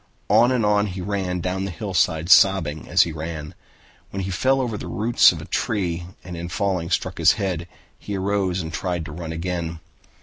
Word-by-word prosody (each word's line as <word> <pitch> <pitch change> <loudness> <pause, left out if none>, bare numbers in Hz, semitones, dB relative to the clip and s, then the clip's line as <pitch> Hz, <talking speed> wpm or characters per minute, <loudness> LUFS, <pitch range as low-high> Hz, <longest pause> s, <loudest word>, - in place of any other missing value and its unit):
On 115 +4 +5
and 125 -4 +1
on 105 0 +3
he 95 -1 -6
ran 90 -2 -2
down 95 +2 -2
the - - -3
hillside, 85 -2 0
sobbing 85 -7 +4
as - - +5
he 85 - -4
ran. 80 -1 -6 0.6
When 95 0 -4
he 95 - -3
fell 130 +9 +2
over 120 -4 -1
the - - -6
roots 115 +2 +4
of - - -6
a - - -9
tree 90 -5 -2 0.2
and 90 -1 -7
in 85 +1 -5
falling 90 -2 -1
struck 95 -1 -1
his 85 +3 +6
head, 95 -6 -3 0.3
he 100 -1 -4
arose 95 -1 0
and 80 0 -7
tried 90 -3 -2
to 75 - -7
run 85 +2 -7
on 80 - -5
again. 85 -1 -3
90 Hz, 205 wpm, -23 LUFS, 85-100 Hz, 0.6 s, his